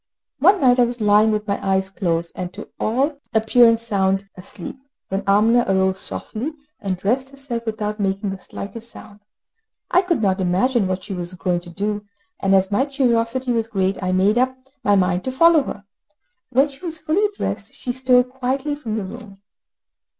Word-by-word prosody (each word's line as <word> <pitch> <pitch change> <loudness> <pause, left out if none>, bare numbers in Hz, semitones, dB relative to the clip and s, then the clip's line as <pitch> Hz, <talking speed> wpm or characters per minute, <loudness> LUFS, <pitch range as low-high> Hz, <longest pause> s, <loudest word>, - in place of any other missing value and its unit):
One 380 +8 +5
night 250 -2 +5
I 245 - +6
was 240 0 -5
lying 210 +1 +4
with 215 0 -1
my 200 - -2
eyes 190 0 0
closed, 170 -3 -1
and 180 -1 -5
to, 210 - -9
all 275 +6 0 0.2
appearance 230 +1 +5
sound 195 -3 0
asleep, 180 +5 -9 0.3
when 195 +1 -1
Amina 220 +4 +4
arose 190 0 +2
softly, 255 +11 -4 0.3
and 195 -4 -2
dressed 250 +8 0
herself 270 -4 -6
without 215 -1 -3
making 195 0 -1
the 195 - -6
slightest 225 +5 -8
sound. 205 -3 -13 0.7
I 360 - +5
could 355 -4 0
not 195 -3 +1
imagine 195 +5 +2
what 185 0 -2
she 200 - -6
was 180 0 -4
going 180 0 0
to 175 0 -12
do, 205 +3 -3 0.4
and 195 0 +3
as 190 +1 +2
my 260 +8 +2
curiosity 250 -2 +1
was 230 -2 0
great 195 -3 -1
I 185 -1 -1
made 195 +5 +3
up 260 +1 +1 0.3
my 205 - +4
mind 185 -1 +1
to 260 - -1
follow 330 +4 +5
her. 205 - -6 0.7
When 265 +3 +4
she 280 +3 -15
was 330 -2 -3
fully 380 +7 +1
dressed, - - -4
she 250 - -4
stole 250 -1 +4
quietly 265 +3 -2
from 240 -7 -4
the 215 - -2
room. 200 0 -9
215 Hz, 185 wpm, -21 LUFS, 195-255 Hz, 0.7 s, I